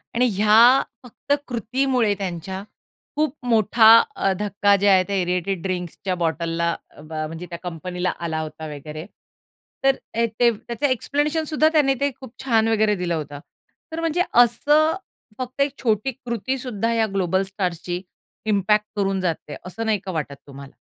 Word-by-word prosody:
आणि 250 +1 +3
ह्या 220 +6 +6 0.2
फक्त 250 +3 -3
कृतीमुळे 245 -1 0
त्यांच्या, 190 0 -5 0.5
खूप 300 -1 0
मोठा 225 0 +4 0.3
अ, 195 - +1
धक्का 205 0 +2
जे 205 - +3
आहे 190 -1 +5
त्या 200 - -2
एअरेटेड 180 0 -1
ड्रिंक्सच्या 185 0 -3
बॉटलला 170 0 -1 0.3
अ, - - -12
बा 155 0 -4
म्हणजे 165 +3 -7
त्या 170 - -6
कंपनीला 180 +1 -3
आला 160 -2 -2
होता 155 0 -7
वगैरे. 150 +3 -8 0.8
तर 270 0 +4 0.2
अ, 230 +1 +2
ते 240 -1 +5
त्याचं 235 +4 -5
एक्सप्लेनेशन 290 +5 0
सुद्धा 310 +1 +4
त्याने 290 -4 +4
ते 280 0 +1
खूप 260 -3 -11
छान 225 -4 +3
वगैरे 215 -1 +2
दिलं 180 -2 -2
होतं. 145 -2 -5 0.5
तर 320 - -4
म्हणजे 330 +1 0
असं 295 +7 +4 0.4
फक्त 255 +2 -4
एक 280 0 +2
छोटी 220 +2 +1
कृती 240 +3 -2
सुद्धा 230 -3 -2
या 225 -1 +2
ग्लोबल 190 0 +1
स्टार्सची 180 -2 -3 0.4
इम्पॅक्ट 210 0 +2
करून 195 -1 0
जाते 165 -4 -3
असं 225 +5 -5
नाही 215 -2 +1
का 190 - -3
वाटत 150 -4 -4
तुम्हाला? 140 0 -11
205 Hz, 160 wpm, -22 LUFS, 175-245 Hz, 0.8 s, ह्या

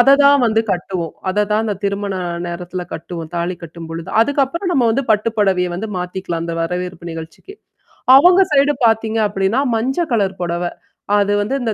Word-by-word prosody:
அததான் 280 +1 +6
வந்து 220 0 +2
கட்டுவோம். 175 -2 -4 0.2
அத 205 +2 +1
தான் 215 +1 +2
அந்த 210 -2 -2
திருமண 200 0 -2 0.3
நேரத்தில 180 +1 -5
கட்டுவோம். 165 0 -7
தாலி 175 +1 -2
கட்டும்பொழுது. 165 +1 -8
அதுக்கப்புறம் 285 - 0
நம்ம 250 -3 +3
வந்து 275 +4 0
பட்டுப்படவைய 205 -4 +1
வந்து 215 +5 -4
மாத்திக்கலாம், 180 -2 -4
அந்த 170 - -4
வரவேற்பு 180 0 -4
நிகழ்ச்சிக்கு. 165 - -9 0.6
அவங்க 355 +6 +6
சைடு 285 +1 +4
பார்த்தீங்க 225 0 +1
அப்டின்னா, 195 +5 0 0.2
மஞ்ச 255 +4 -2 0.2
கலர் 195 -3 0
புடவ. 175 0 -2 0.5
அது 205 0 +1
வந்து 225 +7 -1
இந்த 225 -3 -1
200 Hz, 155 wpm, -18 LUFS, 175-230 Hz, 0.6 s, அததான்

